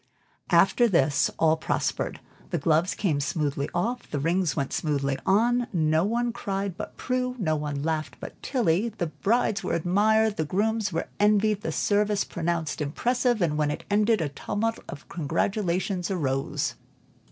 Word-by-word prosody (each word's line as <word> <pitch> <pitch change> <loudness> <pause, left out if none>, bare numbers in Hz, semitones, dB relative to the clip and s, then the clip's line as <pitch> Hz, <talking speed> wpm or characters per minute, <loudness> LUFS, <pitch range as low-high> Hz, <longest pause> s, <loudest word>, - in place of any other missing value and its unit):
After 240 - +5
this, 145 -7 +3
all 160 0 +3
prospered. - - -2 0.3
The - - -1
gloves 160 +3 +2
came 165 -8 0
smoothly 145 0 -1
off, 235 +8 -2
the 150 - -2
rings 170 +1 +1
went 140 - -2
smoothly 140 -3 -1
on; 240 +5 +3
no 160 -3 +2
one 235 +3 0
cried 195 -5 -3
but 210 - -7
Prue, 250 0 -1
no 160 -8 0
one 145 -2 -3
laughed 155 -1 -2
but - - -9
Tilly; 225 - +1
the 200 -5 -3
brides 195 - 0
were - - -2
admired, 210 +5 +2
the 160 - +1
grooms 210 +6 0 0.3
envied; 210 0 +3
the 230 - -3
service 205 0 +1
pronounced 165 -2 -2
impressive, 240 - +1
and 150 -2 0
when 150 -1 +2
it 150 - -4
ended, 210 0 +3
a 150 - -1
tumult 225 +10 -2
of 145 - -9
congratulations 180 +3 -1
arose. 135 -8 -1
180 Hz, 155 wpm, -26 LUFS, 155-215 Hz, 0.3 s, After